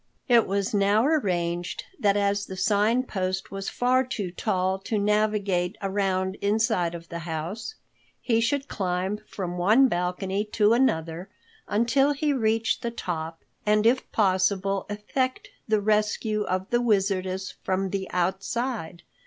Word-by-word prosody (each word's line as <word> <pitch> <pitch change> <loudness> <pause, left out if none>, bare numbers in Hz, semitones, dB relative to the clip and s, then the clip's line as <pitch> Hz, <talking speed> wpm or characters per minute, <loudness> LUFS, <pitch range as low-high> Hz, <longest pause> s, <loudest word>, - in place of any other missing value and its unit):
It 240 -3 +5
was 200 +1 -1
now 205 +3 +3
arranged 175 - 0 0.2
that 205 -1 +3
as 200 0 0
the 190 - -7
Sign 210 +6 +2
Post 190 -5 -3
was 195 0 -4
far 255 +1 +2
too 210 -8 -4
tall 190 -1 -1
to 210 +3 -2
navigate 205 -3 +1
around 190 -1 -1
inside 205 -4 +1
of 170 0 -10
the 170 - -5
house, 170 - -5 0.4
he 230 -2 +1
should 275 +4 0
climb 190 +1 -2
from 180 -2 -5
one 220 +9 +5
balcony 190 +1 -1
to 210 0 +4
another 170 -7 0 0.4
until 240 +7 +2
he 290 +1 0
reached 225 -3 +1
the 235 - -2
top 165 -7 -5 0.2
and 210 0 +2
if 250 +3 +2
possible 195 -1 +1
effect 255 +5 -2 0.2
the 215 -1 +3
rescue 215 0 +1
of 185 +1 -2
the 240 0 +3
Wizardess 190 -4 0
from 190 0 -1
the 195 -1 -3
outside. 190 0 -2
200 Hz, 140 wpm, -26 LUFS, 185-225 Hz, 0.4 s, It